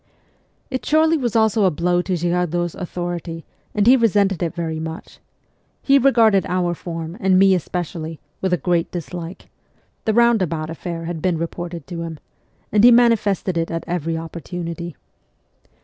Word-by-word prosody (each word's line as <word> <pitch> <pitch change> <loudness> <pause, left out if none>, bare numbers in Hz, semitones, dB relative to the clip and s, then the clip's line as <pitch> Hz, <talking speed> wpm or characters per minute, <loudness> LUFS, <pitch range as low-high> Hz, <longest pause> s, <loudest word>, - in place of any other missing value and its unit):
It 260 - -2
surely 315 +1 +3
was 245 -8 -1
also 220 -1 +3
a 190 - +5
blow 175 +2 +1
to 185 0 -2
Girardot's 175 0 0
authority, 175 -2 -5 0.3
and 205 -1 +2
he 250 +3 +8
resented 205 -6 +2
it 170 0 -2
very 160 -2 -3
much. 160 0 -7 0.6
He 275 0 +5
regarded 230 -7 +4
our 180 -1 0
form, 165 +1 -6
and 190 -3 +3
me 195 0 +6
especially, 165 -2 -3 0.2
with 180 -2 0
great 175 -2 +1
dislike 175 0 -7 0.6
(the 220 - +2
roundabout 185 -10 +2
affair 165 0 -5
had 165 -1 -4
been 180 -1 +1
reported 170 +1 -5
to 170 -2 -6
him), 165 -1 -5 0.5
and 210 +1 +3
he 245 - +10
manifested 215 -7 +3
it 165 - -1
at 165 -1 -3
every 165 -1 -2
opportunity. 170 +1 -6
175 Hz, 150 wpm, -21 LUFS, 165-200 Hz, 0.6 s, he